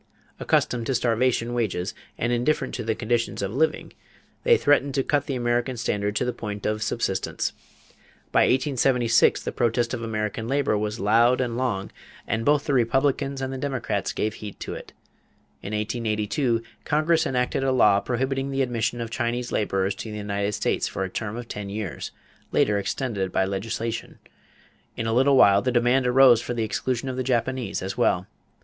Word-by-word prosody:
Accustomed 120 -2 +1
to 135 - 0
starvation 120 0 +1
wages 100 -6 -1 0.2
and 120 +1 0
indifferent 125 +6 0
to 120 - -3
the 110 0 -1
conditions 115 -2 -1
of 100 +1 -3
living, 155 +5 0 0.5
they 475 -1 +5
threatened 140 -1 +2
to 135 - +2
cut 145 0 0
the 135 - -2
American 120 +1 0
standard 105 -2 -1
to 115 - +1
the 125 - -1
point 105 -2 -6
of 105 0 -1
subsistence. 110 -4 -1 0.8
By - - +4
1876 125 -3 +3
the - - -3
protest 120 0 0
of 120 - -3
American 110 0 -3
labor 140 -3 +1
was 105 +1 -2
loud 115 +5 +4
and 120 -3 -1
long 115 -6 -2 0.3
and 110 +1 -1
both 145 +1 +3
the 145 - 0
Republicans 135 +2 +1
and 130 0 -3
the 135 - -5
Democrats 135 -3 -2
gave 110 0 -1
heed 105 -2 -9
to - - -4
it. - - -9 0.7
In 100 - -6
1882 110 +3 -1 0.2
Congress 155 +2 +2
enacted 125 +1 0
a 135 - +2
law 105 -6 +5
prohibiting 135 +4 -1
the 135 0 +1
admission 120 -1 -1
of 115 -1 -5
Chinese 120 0 -2
laborers 95 -2 0
to 110 - -7
the 105 - -5
United 100 0 -2
States - - 0
for 95 - -3
a 95 - -3
term 110 +2 -4
of 120 -1 -7
ten 105 -3 -6
years 100 - -4 0.4
later 105 -1 +2
extended 100 -3 -2
by 95 - +2
legislation. 115 +4 -4 0.8
In 115 - -2
a 115 - 0
little 135 +3 +4
while 100 -4 +6
the 125 - 0
demand 125 +2 +3
arose 125 -2 +6
for 120 - -4
the 115 - 0
exclusion 125 +3 -2
of 130 -1 -3
the 130 - -1
Japanese 125 -4 -1
as 95 +6 -4
well. 90 -6 +2
120 Hz, 180 wpm, -25 LUFS, 105-130 Hz, 0.8 s, while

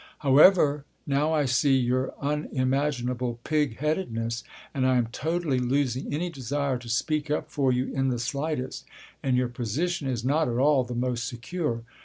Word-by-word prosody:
However, 145 +1 +5 0.2
now 145 +2 +1
I 150 -2 +2
see 130 +1 +3
here 125 - 0
your 130 +1 0
unimaginable 130 -4 -1
pig 150 -7 0
headedness, 120 -7 -2 0.3
and 130 -1 +1
I 130 -1 +3
am 120 - +2
totally 160 -1 -1
losing 130 0 0
any 170 +5 -2
desire 140 -1 -2
to 120 -1 -10
speak 150 +5 0
up 150 +1 -2
for 135 -3 +2
you 125 +1 -1
in 135 0 +1
the 125 -2 0
slightest. 140 +2 -3 0.4
And 130 -2 +1
your 125 0 +2
position 135 - -2
is 120 -2 -2
not 150 +4 +2
at 120 -1 -1
all 140 0 +4
the 120 0 -6
most 120 -1 -1
secure. 120 -1 -3
135 Hz, 170 wpm, -26 LUFS, 125-150 Hz, 0.4 s, However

